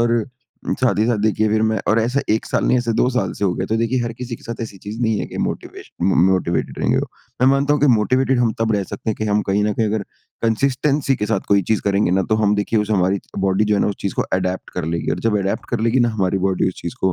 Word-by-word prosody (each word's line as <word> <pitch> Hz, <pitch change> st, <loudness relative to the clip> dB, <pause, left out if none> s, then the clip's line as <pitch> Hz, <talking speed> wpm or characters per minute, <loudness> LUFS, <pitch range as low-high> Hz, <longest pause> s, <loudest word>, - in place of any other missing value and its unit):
और 115 Hz, -2 st, +2 dB, 0.6 s
साथ 130 Hz, -4 st, +2 dB
ही 105 Hz, -, +3 dB
साथ 120 Hz, -3 st, +1 dB
देखिए 110 Hz, 0 st, +2 dB
फिर 110 Hz, +1 st, +1 dB
मैं 110 Hz, -1 st, +1 dB
और 110 Hz, -, +4 dB
ऐसा 125 Hz, +5 st, 0 dB
1 110 Hz, -, +1 dB
साल -, -, 0 dB
नहीं -, -, +3 dB
ऐसे 120 Hz, -1 st, -1 dB
2 125 Hz, -, +4 dB
साल 125 Hz, -7 st, -1 dB
से -, -, -1 dB
हो 95 Hz, -, +2 dB
गया। 95 Hz, -, -3 dB
तो 110 Hz, -, 0 dB
देखिए 115 Hz, +3 st, 0 dB
हर 115 Hz, -1 st, -3 dB
किसी 120 Hz, -2 st, -5 dB
के -, -, -21 dB
साथ 115 Hz, 0 st, -6 dB
ऐसी 100 Hz, -4 st, -7 dB
चीज़ 110 Hz, +3 st, -6 dB
नहीं 110 Hz, -2 st, +1 dB
है -, -, -3 dB
कि -, -, -8 dB
मोटिवेशन -, -, -6 dB
म 95 Hz, -, +3 dB
मोटिवेटेड 90 Hz, -2 st, -1 dB
रहेंगे -, -, +1 dB
वो। -, -, -2 dB, 0.3 s
मैं 130 Hz, -, +4 dB
मानता 140 Hz, +2 st, +3 dB
हूँ 150 Hz, -, +1 dB
कि 145 Hz, -, +4 dB
मोटिवेटेड 130 Hz, +3 st, +2 dB
हम 115 Hz, -2 st, +2 dB
तब 115 Hz, 0 st, +1 dB
रह 100 Hz, -, +1 dB
सकते 110 Hz, -, -4 dB
हैं 110 Hz, -, -1 dB
कि 110 Hz, -, -3 dB
हम 105 Hz, 0 st, +1 dB
कहीं 100 Hz, +2 st, +2 dB
न 105 Hz, -, +1 dB
कहीं 110 Hz, +1 st, 0 dB
अगर 105 Hz, 0 st, -1 dB, 0.4 s
कंसिस्टेंसी 135 Hz, +4 st, +1 dB
के 105 Hz, -, -2 dB
साथ 105 Hz, -3 st, 0 dB
कोई 100 Hz, -1 st, +4 dB
चीज़ 110 Hz, -, +2 dB
करेंगे 100 Hz, -2 st, +1 dB
ना 95 Hz, +1 st, +2 dB
तो -, -, +4 dB
हम 105 Hz, -1 st, +2 dB
देखिए 105 Hz, +2 st, 0 dB
उससे 105 Hz, +1 st, 0 dB
हमारी 95 Hz, 0 st, +2 dB, 0.2 s
बॉडी 95 Hz, +2 st, +2 dB
च -, -, -3 dB
जो 105 Hz, -, +3 dB
है -, -, +1 dB
ना -, -, +2 dB
उस 100 Hz, -, -3 dB
चीज़ 100 Hz, -, -2 dB
को -, -, 0 dB
एडैप्ट 95 Hz, 0 st, -3 dB
कर 90 Hz, -3 st, -4 dB
लेगी 85 Hz, +1 st, -2 dB
और -, -, -1 dB
जब 105 Hz, -, +1 dB
एडैप्ट 100 Hz, 0 st, -2 dB
कर 120 Hz, -3 st, -1 dB
लेगी 115 Hz, +3 st, +2 dB
ना 120 Hz, -, +3 dB
हमारी 95 Hz, -3 st, 0 dB
बॉडी 95 Hz, 0 st, +1 dB
उस 95 Hz, -, -5 dB
चीज़ 85 Hz, -, -5 dB
को, 95 Hz, -1 st, +2 dB
110 Hz, 295 wpm, -20 LUFS, 100-120 Hz, 0.6 s, और